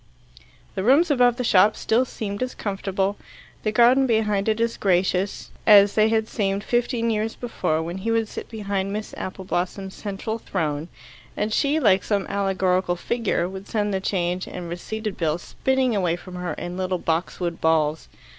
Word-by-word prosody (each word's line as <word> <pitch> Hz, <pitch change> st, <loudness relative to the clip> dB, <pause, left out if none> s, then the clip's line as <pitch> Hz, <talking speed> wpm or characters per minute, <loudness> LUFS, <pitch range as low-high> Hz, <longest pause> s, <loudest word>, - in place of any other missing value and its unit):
The 190 Hz, -, -2 dB
rooms 290 Hz, -, +4 dB
above 245 Hz, -3 st, +4 dB
the 250 Hz, -, -3 dB
shop 205 Hz, -1 st, +5 dB
still 235 Hz, +4 st, +1 dB
seemed 205 Hz, -4 st, -5 dB
as 255 Hz, 0 st, -2 dB
comfortable, 195 Hz, 0 st, -2 dB, 0.4 s
the 215 Hz, -, 0 dB
garden 245 Hz, +4 st, +5 dB
behind 215 Hz, -3 st, +1 dB
it 215 Hz, 0 st, 0 dB
as 230 Hz, 0 st, 0 dB
gracious, 185 Hz, 0 st, 0 dB, 0.2 s
as 205 Hz, -2 st, +8 dB
they 215 Hz, 0 st, +4 dB
had 220 Hz, -1 st, +1 dB
seemed 200 Hz, -2 st, -1 dB
fifteen 240 Hz, -1 st, 0 dB
years 220 Hz, +1 st, -1 dB
before, 160 Hz, -9 st, -1 dB
when 170 Hz, +3 st, -5 dB
he 220 Hz, +4 st, -3 dB
would 225 Hz, -1 st, +1 dB
sit -, -, -8 dB
behind 200 Hz, -3 st, -3 dB
Miss 210 Hz, +1 st, -5 dB
Appleblossom's 190 Hz, +1 st, -4 dB
central 210 Hz, +2 st, -4 dB
throne, 155 Hz, -6 st, -2 dB, 0.5 s
and 215 Hz, +1 st, -1 dB
she, 290 Hz, +6 st, +2 dB
like 200 Hz, -8 st, +4 dB
some 200 Hz, -2 st, 0 dB
allegorical 190 Hz, -2 st, 0 dB
figure, 215 Hz, -2 st, -1 dB
would 190 Hz, +1 st, -8 dB
send 210 Hz, -2 st, -1 dB
the 190 Hz, -, -1 dB
change 180 Hz, -1 st, -1 dB
and 175 Hz, -2 st, -7 dB
receipted 215 Hz, +4 st, -5 dB
bills 165 Hz, 0 st, -1 dB
spinning 265 Hz, -3 st, 0 dB
away 180 Hz, -4 st, +1 dB
from 180 Hz, +1 st, -11 dB
her 180 Hz, -2 st, -3 dB
in 175 Hz, +4 st, -6 dB
little 185 Hz, -1 st, -1 dB
boxwood 170 Hz, +1 st, -2 dB
balls. 160 Hz, -1 st, +1 dB
200 Hz, 170 wpm, -23 LUFS, 185-225 Hz, 0.5 s, as